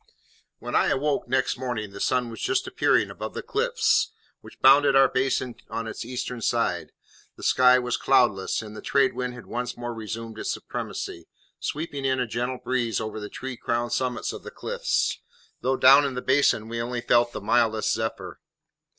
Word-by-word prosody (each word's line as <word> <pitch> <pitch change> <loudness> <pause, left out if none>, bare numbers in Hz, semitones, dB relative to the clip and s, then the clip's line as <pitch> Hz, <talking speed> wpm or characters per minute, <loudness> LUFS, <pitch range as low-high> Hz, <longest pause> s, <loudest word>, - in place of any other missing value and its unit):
When - - -7
I - - +4
awoke 145 -1 0
next 130 0 0
morning 115 -5 -3
the 100 - -9
sun 125 0 0
was 115 - -8
just 380 +1 0
appearing 370 - +2
above - - -7
the - - -4
cliffs 450 0 +1 0.3
which - - -15
bounded 140 +1 +6
our 135 0 +7
basin 130 -1 0 0.2
on 115 - -3
its 110 - -5
eastern 125 0 -5
side, - - 0 0.4
the - - -13
sky 125 0 +5
was 125 -1 -1
cloudless, 120 -8 +2
and 105 0 -10
the - - -8
trade 140 -1 +2
wind 125 0 -3
had 120 - -11
once 125 0 -4
more 120 0 -4
resumed 110 0 -6
its - - -2
supremacy, 85 -1 -5 0.3
sweeping 145 -2 -4
in 130 -1 +1
a 125 - +1
gentle 120 +3 -3
breeze 120 -4 -1
over 110 -1 -5
the 105 0 -6
tree 130 0 -6
crowned 120 0 -1
summits 125 -3 -1
of - - -8
the 470 - -8
cliffs, - - -1 0.4
though 130 +1 +1
down 135 +3 +7
in 140 -2 -2
the 125 - -3
basin 130 -5 +3
we 115 0 -3
only 120 +1 -3
felt 120 0 +3
the - - -5
mildest 110 +1 +2
zephyr. 110 0 -4
125 Hz, 185 wpm, -25 LUFS, 115-135 Hz, 0.4 s, our